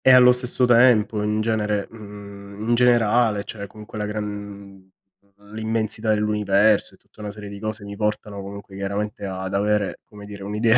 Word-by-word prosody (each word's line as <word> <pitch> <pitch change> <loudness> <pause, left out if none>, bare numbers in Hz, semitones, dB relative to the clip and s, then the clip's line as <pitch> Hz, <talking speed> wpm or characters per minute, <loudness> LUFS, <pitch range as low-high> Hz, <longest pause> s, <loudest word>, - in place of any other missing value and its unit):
E - - +7
allo 125 -1 +8
stesso 125 0 +1
tempo 115 -3 +5
in 105 +1 0
genere 105 -2 0
mhmm, 100 -1 -9
in - - +4
generale, 120 -3 +3
cioè, 100 0 -7
comunque 105 +1 -10
la 105 - -1
gran 100 -2 -7 0.6
l'immensità 110 0 -1
dell'universo, 105 -1 +2
e - - -26
tutta - - -18
una 105 - -4
serie 105 0 -8
di 100 0 -8
cose 110 0 -4
mi 100 0 -7
portano, 105 -1 -2
comunque, 100 0 -9
chiaramente 100 +1 -3
ad 95 0 -4
avere, 105 0 +1
come 105 -2 -13
dire, 100 -1 -9
un'idea 110 +3 +3
105 Hz, 165 wpm, -23 LUFS, 100-110 Hz, 0.6 s, allo